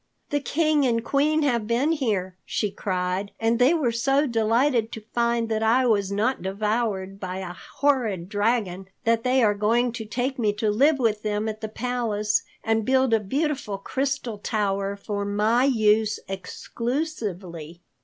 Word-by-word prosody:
"The 290 Hz, -, +2 dB
King 305 Hz, 0 st, +1 dB
and 230 Hz, -1 st, 0 dB
Queen 300 Hz, +2 st, +2 dB
have 235 Hz, -6 st, +1 dB
been 245 Hz, +7 st, +2 dB
here," 210 Hz, -, -1 dB
she 210 Hz, -, -2 dB
cried, 185 Hz, +1 st, -2 dB
"and 230 Hz, +1 st, +1 dB
they 250 Hz, +4 st, +5 dB
were 275 Hz, -8 st, +1 dB
so 270 Hz, +5 st, +2 dB
delighted 230 Hz, 0 st, +2 dB
to 220 Hz, -2 st, -8 dB
find 235 Hz, -1 st, +1 dB
that 220 Hz, -1 st, 0 dB
I 235 Hz, +4 st, +3 dB
was 200 Hz, -4 st, +2 dB
not 220 Hz, +6 st, 0 dB
devoured 195 Hz, 0 st, -2 dB
by 185 Hz, -1 st, -4 dB
a 185 Hz, -2 st, -5 dB
horrid 225 Hz, -6 st, -1 dB
dragon 205 Hz, -3 st, -1 dB, 0.2 s
that 230 Hz, -1 st, +2 dB
they 255 Hz, 0 st, +3 dB
are 210 Hz, -2 st, +4 dB
going 230 Hz, +4 st, +1 dB
to 225 Hz, -1 st, -6 dB
take 255 Hz, +4 st, -2 dB
me 210 Hz, -3 st, +2 dB
to 210 Hz, 0 st, 0 dB
live 280 Hz, +8 st, +4 dB
with 220 Hz, -5 st, +1 dB
them 210 Hz, 0 st, -1 dB
at 215 Hz, 0 st, -5 dB
the 220 Hz, -, -4 dB
palace, 220 Hz, -3 st, -1 dB, 0.2 s
and 225 Hz, 0 st, +1 dB
build 260 Hz, 0 st, +2 dB
a 225 Hz, -, +5 dB
beautiful 265 Hz, -1 st, -2 dB
crystal 260 Hz, 0 st, -3 dB
tower 200 Hz, -2 st, -1 dB
for 200 Hz, 0 st, -4 dB
my 210 Hz, +5 st, +2 dB
use 215 Hz, -4 st, +3 dB
exclusively." 190 Hz, -, -4 dB
225 Hz, 165 wpm, -25 LUFS, 205-250 Hz, 0.2 s, they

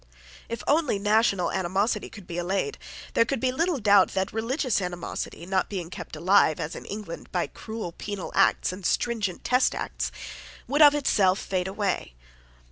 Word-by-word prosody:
If 230 Hz, -, -4 dB
only 295 Hz, -7 st, +2 dB
national 205 Hz, -3 st, +2 dB
animosity 190 Hz, +4 st, 0 dB
could 205 Hz, -4 st, -12 dB
be 170 Hz, 0 st, -4 dB
allayed, 195 Hz, -, -1 dB, 0.3 s
there -, -, +5 dB
could 265 Hz, +4 st, -2 dB
be 260 Hz, -1 st, +1 dB
little 330 Hz, +4 st, 0 dB
doubt 200 Hz, -5 st, +4 dB
that 190 Hz, +1 st, -1 dB
religious 235 Hz, +1 st, 0 dB
animosity, 175 Hz, -1 st, -5 dB
not 190 Hz, 0 st, 0 dB
being 180 Hz, -4 st, -5 dB
kept -, -, -7 dB
alive, 185 Hz, -4 st, +4 dB
as 165 Hz, +1 st, -4 dB
in -, -, -8 dB
England, 205 Hz, -5 st, -7 dB
by 175 Hz, -2 st, 0 dB
cruel 220 Hz, -5 st, -7 dB
penal 200 Hz, +1 st, -6 dB
acts -, -, +3 dB
and 185 Hz, +1 st, -9 dB
stringent 210 Hz, -1 st, -1 dB
test 250 Hz, +1 st, +2 dB
acts, -, -, -3 dB, 0.6 s
would 290 Hz, +3 st, +1 dB
of 295 Hz, -1 st, +8 dB
itself 195 Hz, -10 st, +3 dB
fade 185 Hz, -3 st, -2 dB
away. 190 Hz, -, -2 dB
200 Hz, 165 wpm, -26 LUFS, 185-230 Hz, 0.6 s, of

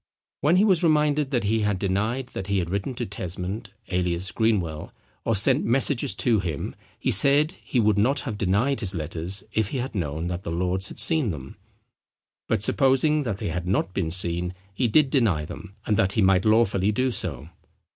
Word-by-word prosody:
When 155 Hz, +5 st, +3 dB
he 195 Hz, +3 st, +4 dB
was 185 Hz, -6 st, +3 dB
reminded 150 Hz, -3 st, +2 dB
that 125 Hz, -4 st, 0 dB
he 110 Hz, +2 st, +1 dB
had 105 Hz, -2 st, 0 dB
denied 105 Hz, +7 st, -1 dB
that 95 Hz, -, -6 dB
he 100 Hz, 0 st, 0 dB
had 85 Hz, -2 st, -2 dB
written 100 Hz, +6 st, -3 dB
to 120 Hz, -, -3 dB
Tesmond 95 Hz, +2 st, -5 dB, 0.2 s
alias 90 Hz, 0 st, -1 dB
Greenwell, 90 Hz, -9 st, -1 dB, 0.3 s
or 115 Hz, -, +1 dB
sent 100 Hz, -, +4 dB
messages 135 Hz, +2 st, +2 dB
to 115 Hz, -4 st, +2 dB
him, 80 Hz, -7 st, -4 dB, 0.3 s
he -, -, 0 dB
said 140 Hz, -, +4 dB
he 125 Hz, -, -1 dB
would 105 Hz, -2 st, +2 dB
not 130 Hz, +7 st, +2 dB
have 120 Hz, -7 st, -5 dB
denied 105 Hz, +8 st, 0 dB
his 100 Hz, -4 st, -2 dB
letters 85 Hz, +4 st, -2 dB
if 110 Hz, -2 st, +1 dB
he 135 Hz, -, -4 dB
had 130 Hz, +1 st, -4 dB
known 80 Hz, -4 st, -3 dB
that 90 Hz, 0 st, -3 dB
the -, -, -6 dB
lords 90 Hz, +3 st, -1 dB
had -, -, -10 dB
seen 160 Hz, -8 st, +3 dB
them; 70 Hz, -6 st, -7 dB, 0.9 s
but 110 Hz, -3 st, 0 dB
supposing 135 Hz, +5 st, +2 dB
that 115 Hz, -8 st, -3 dB
they -, -, -4 dB
had 90 Hz, +2 st, -4 dB
not 95 Hz, 0 st, 0 dB
been 90 Hz, -5 st, -1 dB
seen 90 Hz, +1 st, 0 dB, 0.2 s
he 120 Hz, +5 st, 0 dB
did 135 Hz, +3 st, +3 dB
deny 100 Hz, -, +1 dB
them, 100 Hz, +5 st, -10 dB
and 105 Hz, -, +1 dB
that 95 Hz, 0 st, +2 dB
he 110 Hz, -, +1 dB
might 95 Hz, 0 st, +3 dB
lawfully 105 Hz, -3 st, +3 dB
do 130 Hz, +4 st, 0 dB
so. 80 Hz, -, -3 dB
100 Hz, 195 wpm, -24 LUFS, 90-125 Hz, 0.9 s, he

